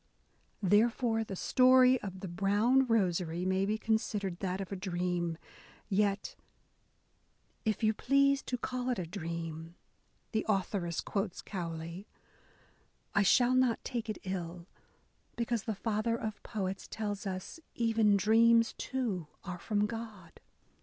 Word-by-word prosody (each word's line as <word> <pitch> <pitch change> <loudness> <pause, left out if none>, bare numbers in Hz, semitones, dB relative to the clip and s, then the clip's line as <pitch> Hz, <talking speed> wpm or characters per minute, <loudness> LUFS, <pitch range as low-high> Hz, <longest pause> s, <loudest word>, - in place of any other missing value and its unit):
Therefore, 225 +3 +3
the 200 -3 -6
story 255 +4 +5
of 190 -2 -7
the 195 - -4
Brown 205 +9 +2
Rosary 180 -6 +1
may 190 +1 +1
be 215 +1 0
considered 210 -5 -1
that 185 0 -2
of 195 -1 -5
a - - -2
dream; 175 -3 -2 0.5
yet 200 0 0 1.3
If 215 +1 0
you 215 0 +4
please 275 +3 +3
to 250 - -2
call 250 +1 -3
it 250 - 0
a 180 - -3
dream," 165 -2 -6 0.6
the 220 -1 0
authoress 190 -4 0
quotes 195 -2 -3
Cowley, 170 0 -5 1.1
I 205 - +4
shall 245 +5 +4
not 255 -2 +2
take 235 -3 -4
it 215 - -2
ill, 175 -2 -5 0.7
because 235 -2 -1
the 220 - -2
father 220 +2 0
of 215 -1 -5
poets 195 -2 -4
tells 205 -2 -4
us, 190 - -5 0.2
even 225 -3 +3
dreams, 230 +3 +5
too, 225 - -2 0.2
are 180 -2 -6
from 210 +1 0
God." 220 -5 -7
205 Hz, 135 wpm, -32 LUFS, 185-230 Hz, 1.3 s, story